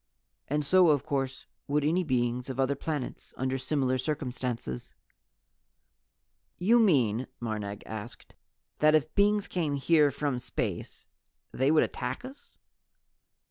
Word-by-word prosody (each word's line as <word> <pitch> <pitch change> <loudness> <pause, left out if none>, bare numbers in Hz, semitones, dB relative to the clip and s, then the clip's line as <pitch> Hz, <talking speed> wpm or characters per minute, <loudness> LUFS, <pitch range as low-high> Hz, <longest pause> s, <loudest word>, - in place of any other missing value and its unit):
And 150 +1 -1
so 185 +2 +5
of 145 -4 +2
course 135 -2 -2 0.2
would 145 0 +1
any 175 +5 +2
beings 125 -3 -1
on 130 0 -5
other 135 +1 +2
planets, 145 -1 -5
under 130 +1 -1
similar 130 -2 0
circumstances." 125 - -4 1.6
"You 225 +7 +4
mean," 130 - +3
Marnag 105 -3 -4
asked, 110 -2 -8 0.5
"that 155 +1 +5
if 155 0 +1
beings 205 0 +3
came 155 -6 -1
here 150 +2 +4
from 140 -2 -2
space - - -4 0.5
they 130 +2 +1
would 155 0 +5
attack 125 - -4
us?" 265 +2 -13
140 Hz, 125 wpm, -29 LUFS, 125-155 Hz, 1.6 s, so